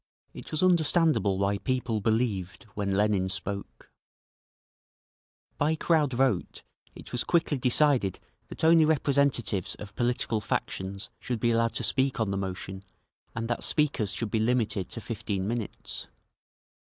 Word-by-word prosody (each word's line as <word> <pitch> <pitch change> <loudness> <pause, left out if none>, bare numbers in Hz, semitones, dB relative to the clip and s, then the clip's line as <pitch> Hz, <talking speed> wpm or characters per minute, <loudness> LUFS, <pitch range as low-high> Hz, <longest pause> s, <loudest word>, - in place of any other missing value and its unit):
It - - -10
was 155 +3 -1
understandable 160 - +3
why 100 +1 0
people 125 -4 -1
believed 110 -4 -1
when 100 -2 -1
Lenin 100 -3 +2
spoke…. 100 +1 -5 1.7
By 150 +2 +2
crowd 155 -4 +2
vote 120 -7 0 0.3
it - - -10
was 120 - -1
quickly 165 -5 +1
decided 125 - +3 0.3
that - - -8
only 165 0 +6
representatives 140 - +1
of 105 0 -10
political 120 -3 0
factions 100 0 -3
should 125 -2 -3
be 120 +2 +2
allowed 115 0 +1
to - - -1
speak 130 -2 +1
on 110 -3 0
the 100 - -1
motion 95 0 -5 0.5
and 115 0 -2
that 120 - -2
speakers 140 -10 +1
should 115 -4 -4
be 110 - +1
limited 110 -4 0
to 115 - -6
fifteen 105 -4 -3
minutes. 115 +1 -4
115 Hz, 140 wpm, -28 LUFS, 100-135 Hz, 1.7 s, only